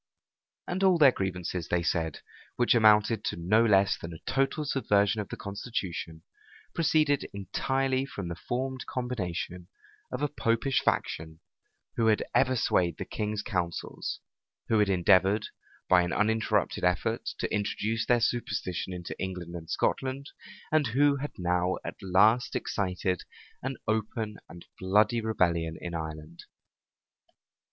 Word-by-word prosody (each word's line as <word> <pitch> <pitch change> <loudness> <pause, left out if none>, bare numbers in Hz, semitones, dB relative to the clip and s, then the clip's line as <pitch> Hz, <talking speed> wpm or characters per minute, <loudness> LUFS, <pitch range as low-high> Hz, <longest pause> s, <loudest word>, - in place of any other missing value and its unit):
And 185 +2 -2
all 190 -2 +5
their 145 -5 +7
grievances, 90 -4 -3
they 90 -1 0
said, 80 -3 -1 0.3
which 120 - +3
amounted 110 -1 +4
to - - -1
no 95 +7 +3
less 100 -3 +3
than 85 0 -7
a - - -8
total 135 +3 +1
subversion 105 -7 +2
of 100 - -8
the - - -6
constitution, 95 -6 -5 0.5
proceeded 155 -3 +2
entirely 135 +6 -1
from 100 -8 -6
the 85 - -4
formed 130 +7 -4
combination 90 -8 -4 0.4
of 125 +3 -3
a - - +3
Popish 125 -1 0
faction, 80 0 -1 0.6
who 115 - +3
had 110 -1 +3
ever 130 -1 +3
swayed 90 -7 +1
the - - -4
king's 105 0 -3
counsels, 85 -3 -3 0.5
who 110 - +3
had 105 -1 +3
endeavored, 95 +2 +4 0.4
by 90 -1 +6
an 85 -1 -1
uninterrupted 110 +1 +1
effort, 95 +6 0
to - - -3
introduce 105 +2 -1
their 120 -1 +3
superstition 100 -6 -1
into 90 -1 -6
England 90 -2 -5
and 80 -2 -8
Scotland, 135 +2 -1 0.4
and 155 -3 +3
who 140 +5 +3
had 145 +2 -5
now 90 0 +1
at - - -7
last 105 +6 +3
excited 90 -2 -1 0.4
an 135 +1 -4
open 110 0 -2
and 85 - -12
bloody 105 +5 +3
rebellion 85 -7 0
in 85 - -6
Ireland. 80 0 -6
105 Hz, 140 wpm, -29 LUFS, 90-125 Hz, 0.6 s, their